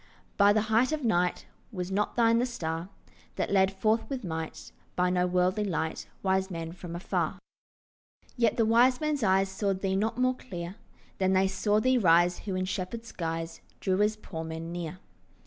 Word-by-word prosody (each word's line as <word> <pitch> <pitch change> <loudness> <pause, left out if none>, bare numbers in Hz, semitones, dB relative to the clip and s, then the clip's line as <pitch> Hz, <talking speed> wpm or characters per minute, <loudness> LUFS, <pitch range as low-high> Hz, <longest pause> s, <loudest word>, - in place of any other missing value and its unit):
From 205 0 +5
the 215 - +4
height 220 +5 +2
of 310 -2 -2
night, 180 -6 +1 0.3
Was 180 -3 -4
not 205 +2 0
thine 230 -1 +4
the 250 - +1
star 165 -6 -4 0.5
That - - -2
led 190 -1 +4
forth 215 +3 0
with 265 -3 -4
might 160 -3 -5 0.2
By 180 0 +2
no 180 0 +2
worldly 180 +3 +1
light 160 -5 -2 0.2
Wise 190 0 +1
men 165 -2 -5
from 175 -1 -8
afar? 175 - -1 1.0
Yet 235 -3 +2
the 230 - +3
wise 245 +3 +4
men's 305 -2 -1
eyes 195 -2 +3
Saw 195 0 -1
thee 190 0 -1
not 220 +4 0
more 255 0 +2
clear 175 -8 -7 0.5
Than 190 0 +2
they 190 0 +4
saw 205 +2 +1
thee 255 +3 +3
rise 175 -2 +4
Who 195 -3 -4
in 185 0 -1
shepherd's 205 +5 -4
guise 165 -1 -4 0.2
Drew 190 0 +1
as 210 +1 +2
poor 165 -6 -7
men 160 +1 -6
near. 175 0 -5
190 Hz, 180 wpm, -29 LUFS, 175-220 Hz, 1.0 s, From